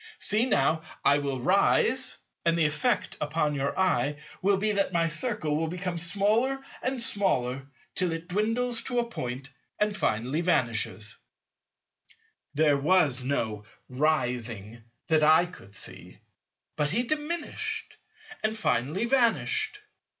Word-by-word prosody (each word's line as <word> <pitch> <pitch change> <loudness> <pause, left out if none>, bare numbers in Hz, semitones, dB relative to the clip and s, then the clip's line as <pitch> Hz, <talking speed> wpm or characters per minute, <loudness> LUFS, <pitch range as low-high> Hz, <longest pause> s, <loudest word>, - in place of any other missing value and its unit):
See 220 +4 +3
now, 155 - +2 0.2
I 145 +1 +5
will 140 -2 -2
rise; 120 - +2 0.3
and 170 0 +2
the 165 - +3
effect 180 +11 0
upon 150 0 0
your 140 0 -2
eye 150 -7 +1 0.2
will 195 +1 +3
be 215 +2 +1
that 200 -2 0
my 165 -1 +1
Circle 165 -4 -1
will 160 +1 0
become 180 0 -3
smaller 210 +10 +2 0.2
and 260 0 -1
smaller 135 - 0 0.3
till 180 -2 +1
it 165 +1 -5
dwindles 225 +5 +1
to 245 - -2
a 240 0 +1
point 135 - -6 0.3
and 210 0 0
finally 125 - 0
vanishes. 115 -9 -1 1.4
There 150 -1 +4
was 150 -4 +3
no 110 -6 -2 0.2
"rising" 120 -6 -1 0.2
that 160 -1 +3
I 160 +3 +6
could 105 - -11
see; - - -7 0.6
but 150 -1 +1
he 225 +9 +1
diminished 305 +4 -3 0.5
and 220 +1 0
finally 160 - 0
vanished. 245 - +1
165 Hz, 130 wpm, -27 LUFS, 135-210 Hz, 1.4 s, I